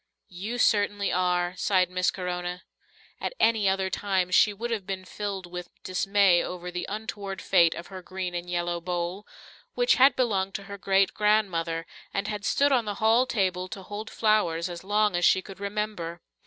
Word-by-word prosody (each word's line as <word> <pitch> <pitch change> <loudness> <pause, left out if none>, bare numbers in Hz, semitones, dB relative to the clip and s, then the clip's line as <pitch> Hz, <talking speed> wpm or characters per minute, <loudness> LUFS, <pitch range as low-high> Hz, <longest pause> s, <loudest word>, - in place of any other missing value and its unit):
"You 205 +7 -5
certainly 205 -3 +2
are," 180 -1 +1
sighed 185 -3 +2
Miss 185 +1 +1
Corona. 180 -1 -4 0.6
At - - -3
any 220 -3 +3
other 190 0 0
time 190 -3 0
she 210 - +5
would 230 +4 -5
have 210 -5 -3
been 190 -1 -4
filled 195 -1 -5
with 180 0 -7
dismay 195 -1 +3
over 180 0 -6
the 180 0 -4
untoward 205 -2 -5
fate 170 -2 +4
of 170 - -7
her 185 - -6
green 185 0 -5
and 175 0 -4
yellow 175 -1 -1
bowl, 175 +3 -3 0.5
which - - +3
had 270 +2 +7
belonged 195 -6 0
to 200 - -4
her 200 0 -9
great 195 0 +2
grandmother 175 -6 +1 0.3
and 200 - -1
had 210 -2 -4
stood 285 +1 +3
on 245 -4 +3
the 205 -1 -3
hall 225 +5 +3
table 185 -5 0
to 195 0 -8
hold 210 +3 -6
flowers 180 -6 +1
as 175 0 -7
long 210 0 +2
as 175 - 0
she 190 - +5
could 195 -1 -11
remember. 200 -4 -3
190 Hz, 180 wpm, -27 LUFS, 180-210 Hz, 0.6 s, had